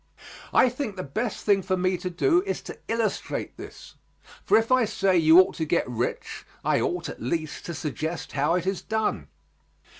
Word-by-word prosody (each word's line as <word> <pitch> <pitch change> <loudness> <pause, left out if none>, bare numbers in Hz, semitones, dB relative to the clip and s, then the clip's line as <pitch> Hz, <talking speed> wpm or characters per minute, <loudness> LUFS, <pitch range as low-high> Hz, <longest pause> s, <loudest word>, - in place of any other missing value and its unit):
I - - +5
think 250 -4 -4
the 185 - -5
best 220 - -4
thing 200 -2 +4
for 185 0 -1
me 185 +1 +1
to 180 - -4
do 340 - +2
is - - -3
to - - -9
illustrate 225 -1 -2
this, - - -11 0.5
for - - +4
if 225 +2 0
I 255 -1 +5
say 195 -3 +1
you 165 0 +7
ought 185 - +5
to 165 - -1
get 170 +2 +1
rich, 120 -1 -3 0.2
I - - +2
ought, - - -2
at - - -8
least, 155 +5 -3
to 170 - -4
suggest 155 +3 -4
how 145 +4 +1
it 180 0 -1
is 190 -1 -1
done. 220 0 -2
185 Hz, 190 wpm, -26 LUFS, 160-220 Hz, 0.5 s, you